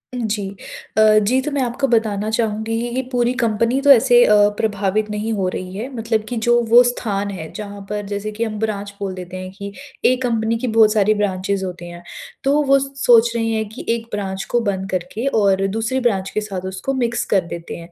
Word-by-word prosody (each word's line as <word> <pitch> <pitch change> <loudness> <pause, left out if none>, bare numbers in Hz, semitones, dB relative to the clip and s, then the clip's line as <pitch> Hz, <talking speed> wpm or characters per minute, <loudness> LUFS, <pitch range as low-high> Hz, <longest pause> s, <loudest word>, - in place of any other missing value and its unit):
जी। 215 -4 -2 0.5
अ, - - +6 0.2
जी 240 +6 +2
तो 300 +2 -4
मैं 280 -1 -1
आपको 250 +3 -1
बताना 215 -3 0
चाहूँगी 220 0 -1
कि 240 0 -4
कि 260 - +1
पूरी 245 0 +1
कंपनी 230 +3 +1
तो 285 0 +6
ऐसे 245 -1 +6
अ, 210 - +4 0.2
प्रभावित 210 0 0
नहीं 215 +2 -2
हो 190 -3 -1
रही 185 0 -6
है 240 +5 -4
मतलब 225 -1 -1
कि 245 - -3
जो 240 0 +5
वो 240 +2 +8
स्थान 205 -5 -2
है 160 -5 -7
जहाँ 205 -1 -7
पर 210 -1 -3
जैसे 205 +1 -4
कि 225 +2 -3
हम 215 -2 -3
ब्रांच 205 -2 -3
बोल 195 -2 -3
देते 185 0 -8
हैं 185 0 -7
कि 200 -1 -7 0.4
एक 255 0 -1
कंपनी 230 -1 0
की 250 +2 -3
बहुत 220 -1 +4
सारी 215 0 +3
ब्रांचेस 195 -1 -1
होते 180 -2 -6
हैं। 175 0 -10 0.4
तो 285 +2 +3
वो 275 0 +5
सोच 245 -4 +3
रही 225 -1 0
हैं 220 -1 -1
कि 220 - -9
1 230 0 -1
ब्रांच 195 -1 -3
को 240 - +3
बंद 190 0 -3
करके 185 +6 -3 0.2
और 195 -1 +2
दूसरी 225 +6 -1
ब्रांच 200 -6 0
के 215 - -2
साथ 190 -3 -5
उसको 190 +9 -3
मिक्स 240 -2 -1
कर 190 - +4
देते 170 0 -7
हैं। 170 +1 -11
215 Hz, 220 wpm, -20 LUFS, 200-235 Hz, 0.5 s, वो